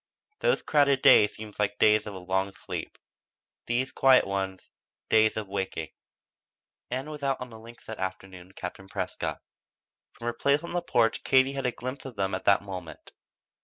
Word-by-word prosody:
Those - - +2
crowded 140 -3 +3
days 105 - +7
seemed 110 -1 -9 0.2
days 105 0 +4
of 100 - -6
a - - -6
long 95 +2 -1
sleep; - - -7 0.7
these 125 +2 0
quiet 135 -1 +5
ones, 95 -1 -4 0.4
days 110 0 +4
of 110 -2 -3
waking. 95 -5 -3 1.0
Ann 130 +5 -3
was 150 -1 -8
out 135 -1 0
on 125 -1 -7
the 110 - -11
links 115 +2 -14
that 110 - -7
afternoon 95 -1 -6
with 95 - -22
Captain 95 +1 -7
Prescott. - - -4 0.7
From 115 - -10
her 120 - 0
place 140 +6 +1
on 170 - -6
the 175 - 0
porch 115 -8 +1
Katie 130 0 +4
had 135 -2 -1
a - - +1
glimpse 130 +4 -7
of 130 -3 -8
them 95 -1 -1
at 95 - -3
that 100 0 +4
moment. 90 -5 -8
110 Hz, 180 wpm, -28 LUFS, 95-130 Hz, 1.0 s, days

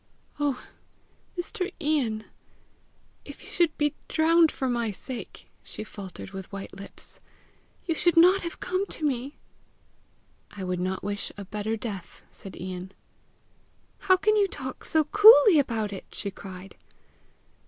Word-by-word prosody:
"Oh, 285 -3 0 0.7
Mr. 365 +2 -3
Ian, 265 -9 0 1.0
if - - -11
you - - -11
should 340 -3 +2
be 295 -1 +1
drowned 325 0 +4
for 265 - -2
my 235 -2 0
sake!" 240 +5 -8
she - - -7
faltered 195 -3 -9
with 190 -1 -8
white 195 -1 -7
lips. 200 0 -7 0.7
"You 335 - +1
should 340 +1 +2
not 365 +4 +7
have 340 - -6
come 375 +2 -1
to 315 - -3
me!" 270 0 -2 1.1
"I 200 - -8
would 180 -1 -2
not 185 +1 -2
wish 205 0 -3
a 200 - -7
better 210 +3 -3
death," 200 -6 -7
said 195 - -11
Ian. 185 +1 -6 1.1
"How 375 -2 +4
can 430 +3 +3
you 410 -2 +4
talk 260 -7 -7
so 315 -1 +3
coolly 415 0 +8
about 225 -6 -1
it!" 190 - -7
she 200 - -4
cried. 190 0 -10
250 Hz, 145 wpm, -27 LUFS, 200-335 Hz, 1.1 s, coolly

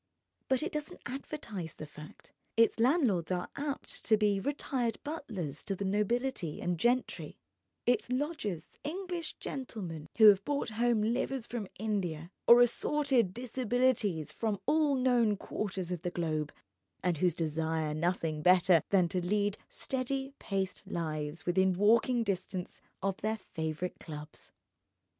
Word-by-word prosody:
But 265 +2 +2
it 350 - -2
doesn't 300 0 -5
advertise 235 - -5
the 155 - -7
fact, 150 +1 -13 0.2
its 230 0 +4
landlords 235 - +3
are 180 -1 -1
apt 285 -1 -4
to 220 - +5
be 205 -2 +2
retired 250 0 -1
butlers 215 - -4
to 195 - -1
the 200 - -3
nobility 210 - 0
and 175 -2 -1
gentry, 245 +4 0 0.5
its 245 -1 +2
lodgers 255 - -3
English 345 +1 -4
gentlemen 185 - -5
who 220 - +8
have 200 -1 +5
brought 285 0 -1
home 230 0 +2
livers 245 +2 0
from 230 -5 -4
India, 180 -6 -2 0.2
or 240 +1 +9
assorted 250 -3 +2
disabilities 240 - 0
from 215 -3 -1
all 300 -3 +3
known 245 -5 +3
quarters 190 -3 -3
of 175 -3 -3
the 175 - -1
globe, 155 -4 -2 0.5
and 175 -3 +1
who 180 +4 +4
desire 160 -1 -1
nothing 160 -1 -1
better 180 0 +6
than 185 -3 +4
to 180 0 -1
lead 205 +2 +1
steady 270 +1 -3
paced 195 -2 -2
lives 155 -3 -3
within 190 +1 +3
walking 230 +5 +4
distance 185 -3 -3 0.2
of 195 -1 0
their 220 +1 0
favourite 160 -2 -4
clubs. 150 -1 -9
205 Hz, 140 wpm, -32 LUFS, 175-250 Hz, 0.5 s, or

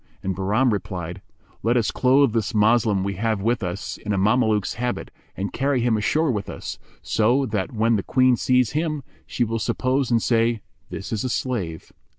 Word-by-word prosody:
and 95 -1 -2
Bahram 105 +6 +2
replied, 90 -3 -5 0.4
"Let 120 +3 +2
us 115 -3 +1
clothe 130 -1 +3
this 110 -3 -1
Moslem 105 -2 +3
we 100 -1 -3
have 110 0 0
with 115 +4 0
us 90 -1 -4
in 105 - -3
a - - 0
Mameluke's 105 +1 +2
habit 120 +1 -3 0.3
and 100 +1 -3
carry 135 0 +1
him 120 -1 +2
ashore 150 +8 +1
with 105 -4 -3
us, - - -6 0.2
so 120 +5 +2
that 105 -5 -2
when 115 -1 +2
the - - -1
Queen 130 +4 +3
sees 125 0 +2
him, 155 -2 -2 0.2
she 125 - 0
will 115 0 -2
suppose 130 +4 0
and 120 -1 +3
say, 115 -1 +2 0.3
'This 100 - -6
is 110 - -1
a 130 - -1
slave.' 105 -10 -3
115 Hz, 185 wpm, -23 LUFS, 100-125 Hz, 0.4 s, clothe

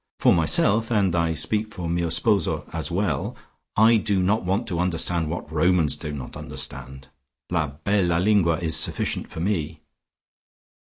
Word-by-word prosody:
For - - +4
myself, 100 +7 +3
and 100 -6 +2
I 85 -1 +1
speak 105 +7 0
for 90 -4 -5
mio 85 0 0
sposo 100 +5 +1
as - - -2
well, - - -1 0.4
I 110 +2 +6
do 100 -3 +1
not 105 +4 +1
want 95 +6 -1
to 85 -3 -2
understand 85 -2 -1
what 80 -2 -5
Romans 80 -1 +2
do 75 - -6
not 70 -4 -7
understand. 65 -1 -6 0.4
La 80 -3 +1
bella 85 +4 0
lingua 90 -3 +3
is 80 -2 -2
sufficient - - -1
for 80 - -7
me." 80 -5 -2
85 Hz, 155 wpm, -24 LUFS, 80-100 Hz, 0.4 s, I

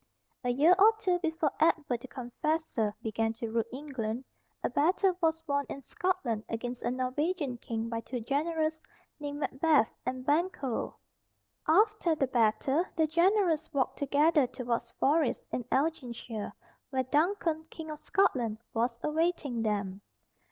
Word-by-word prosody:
A 245 - 0
year 290 +8 +5
or 440 +3 +7
two 370 -5 +1
before 320 -4 0
Edward 305 -6 +2
the 260 - -9
Confessor 255 -2 -1
began 225 0 0
to 225 0 -5
rule 230 0 +2
England, 255 -3 -4 0.4
a - - +1
battle 365 +5 +3
was 325 -1 +1
won 285 0 +1
in 275 - -6
Scotland 275 - -1
against 245 +2 -4
a - - 0
Norwegian 260 +2 -1
King 225 -1 -3
by 230 0 -2
two 250 +2 -5
generals 315 +5 -1 0.4
named 290 0 -4
Macbeth 280 -4 +3
and 255 0 -3
Banquo. 290 -5 0 0.7
After 395 0 +4
the 280 - +1
battle, 255 +5 +2
the 320 -2 +3
generals 340 0 +2
walked 270 -3 0
together 290 0 +3
towards 240 -1 -3
Forres, 295 -1 +2
in 245 - -2
Elginshire, 245 -7 -2 0.4
where 260 -2 0
Duncan, 315 +3 +1
King 315 -1 -7
of 300 - -7
Scotland, 260 - +1 0.2
was 235 +1 0
awaiting 300 -6 0
them. 200 -3 -1
285 Hz, 140 wpm, -30 LUFS, 240-320 Hz, 0.7 s, or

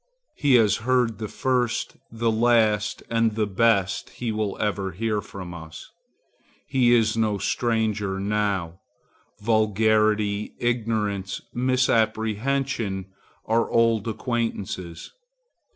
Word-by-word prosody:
He 140 -4 +3
has 110 -4 +4
heard 120 -2 +1
the 110 - -3
first, 125 0 -1 0.2
the 115 0 0
last 110 -2 +2
and 115 -2 +1 0.2
best 100 -4 +2
he 120 -2 -4
will 105 -2 -2
ever 100 -3 -1
hear 105 +2 -1
from 90 -4 -9
us. 80 -2 -10 0.7
He 125 -2 +2
is 115 -2 +3
no 110 -2 +1
stranger 110 -4 -1
now. 100 -4 -1 0.6
Vulgarity, 110 -1 +2
ignorance, 105 -5 -1
misapprehension 115 -3 0 0.3
are 115 +1 +1
old 115 -2 +2
acquaintances. 110 -7 -3
110 Hz, 100 wpm, -24 LUFS, 100-115 Hz, 0.7 s, has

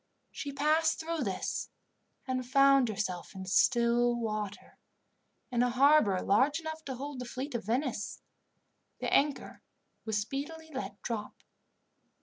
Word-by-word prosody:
She 285 - -5
passed 305 +3 +2
through 330 0 -3
this 190 -2 -3 0.6
and 255 -1 -1
found 275 0 +5
herself 195 -4 -4
in 190 0 -6
still 240 +4 +3
water, 215 -3 -4 0.7
in 240 -1 +1
a 245 - +3
harbour 255 -6 +5
large 265 +10 +3
enough 315 -1 -6
to 265 - -4
hold 275 +1 -6
the 250 - -4
fleet 260 +4 -5
of 235 -5 -3
Venice. 240 -1 -2 0.8
The - - -2
anchor 285 0 +1 0.4
was 220 -2 -1
speedily 295 +9 -4
let 200 -6 -5
drop. 215 -3 -5
250 Hz, 130 wpm, -31 LUFS, 215-285 Hz, 0.8 s, found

